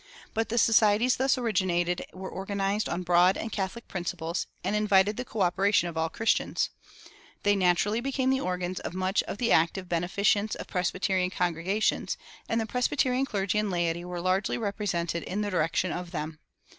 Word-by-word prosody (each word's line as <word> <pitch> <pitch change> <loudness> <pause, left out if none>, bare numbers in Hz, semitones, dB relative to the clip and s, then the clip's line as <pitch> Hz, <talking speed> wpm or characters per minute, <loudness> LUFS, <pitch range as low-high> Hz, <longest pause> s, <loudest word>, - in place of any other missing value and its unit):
But 225 +1 -1
the 235 - -1
societies 225 +1 +4
thus 265 +1 +2
originated 185 -7 0
were 190 0 -7
organized 200 +2 -1
on 175 +1 -2
broad 180 +1 +4
and 225 - -4
catholic 200 +4 -4
principles, 175 -2 -3 0.2
and 210 - 0
invited 205 -1 +3
the 250 - -3
coöperation 195 -3 +2
of 170 - -6
all 160 0 0
Christians. 225 +6 0 0.7
They 205 0 +4
naturally 195 +4 +2
became 265 0 0
the 265 - +2
organs 180 0 -2
of 175 - -6
much 185 +2 +1
of - - -4
the 235 +1 0
active 170 +3 +2
beneficence 200 +5 +1
of - - -7
Presbyterian 185 0 0
congregations, 180 +4 0 0.3
and 230 - +1
the 225 - -1
Presbyterian 255 +2 +1
clergy 200 -3 0
and 210 -1 0
laity 175 -1 -1
were 175 -1 -5
largely 185 +2 +1
represented 195 -6 -2
in 200 +3 -3
the 205 -1 -2
direction 170 +1 +1
of 180 0 -4
them. 155 -1 -5
190 Hz, 170 wpm, -28 LUFS, 175-215 Hz, 0.7 s, societies